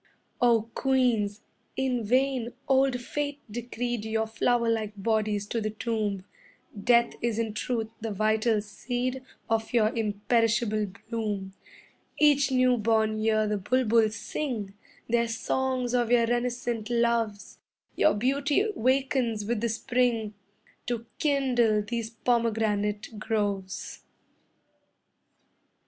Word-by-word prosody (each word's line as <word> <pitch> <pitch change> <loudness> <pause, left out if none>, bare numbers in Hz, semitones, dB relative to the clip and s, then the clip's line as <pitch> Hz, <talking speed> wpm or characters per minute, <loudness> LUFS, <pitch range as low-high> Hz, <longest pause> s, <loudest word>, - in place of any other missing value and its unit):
O 235 -3 +4
Queens, 240 -6 +1 0.4
in 255 -3 0
vain 255 +1 +1
old 265 -2 +3
Fate 285 +3 -3
decreed 240 0 -3
Your 220 0 0
flower 235 +2 +1
like 220 -2 0
bodies 215 0 0
to 230 - -1
the 215 - -1
tomb; 215 -3 -2 0.5
Death 235 +3 +3
is 235 -2 0
in 225 -2 -1
truth 225 0 -2
the 225 - -3
vital 215 +1 +1
seed 245 +5 -3 0.3
Of 225 +1 -1
your 220 -3 +4
imperishable 215 0 +1 0.2
bloom 210 -4 -3 0.6
Each 290 -2 +4
new 255 -1 +3
born 220 0 +1
year 215 0 +2
the 210 -1 -1
bulbuls 225 0 +2
sing 220 -4 -4 0.3
Their 235 0 +2
songs 250 +2 -1
of 240 -2 +2
your 240 -1 +5
renascent 240 -1 -1
loves; 235 -3 0 0.4
Your 310 - +4
beauty 280 - +1
wakens 255 -3 +1
with 225 0 -1
the 235 - 0
spring 235 -2 0 0.5
To 235 -1 -2
kindle 245 -7 +2
these 230 +1 -3
pomegranate 220 -3 0
groves. 200 -3 -2
230 Hz, 115 wpm, -27 LUFS, 215-245 Hz, 0.6 s, your